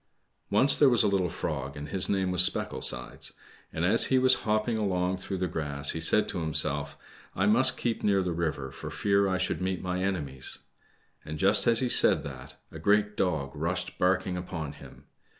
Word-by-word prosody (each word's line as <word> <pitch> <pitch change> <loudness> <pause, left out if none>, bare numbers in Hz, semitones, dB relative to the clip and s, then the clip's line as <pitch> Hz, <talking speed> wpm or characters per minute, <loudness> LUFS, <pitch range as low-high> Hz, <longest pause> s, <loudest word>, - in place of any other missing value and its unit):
O - - -2
NCE 135 +6 +3
there 145 - +6
was 120 -3 +4
a - - +2
little 95 -3 0
frog, 70 -2 -5
and 75 0 -7
his 95 +1 +1
name 95 -2 0
was 90 -1 +4
Specklesides; 65 -8 -1 0.4
and 80 +2 -2
as 110 +5 +6
he 130 - +2
was 130 0 +5 0.2
hopping 110 +2 +1
along 95 -3 -1
through 95 +1 -5
the 90 - -1
grass 75 -3 -2
he 80 - -5
said 105 +6 +2
to - - -4
himself, 75 -3 -1 0.4
I 95 - 0
must 130 +5 +3
keep 115 -2 -2
near 100 -2 +2
the 90 -2 -2
river 75 -6 -3
for - - -8
fear 100 0 +1
I 95 -1 0
should 90 0 -2
meet 95 -1 -3
my 90 0 -2
enemies,'' 75 -9 -2 0.7
and 75 +1 -7
just 100 +8 +3
as 115 0 +4
he 130 - +1
said - - +4
that, 65 -2 -10 0.2
a 80 - -9
great 105 +4 +1
dog 75 -9 -1
rushed - - -3
barking 90 0 0
upon 80 -5 -6
him. - - -15
90 Hz, 200 wpm, -28 LUFS, 80-100 Hz, 0.7 s, there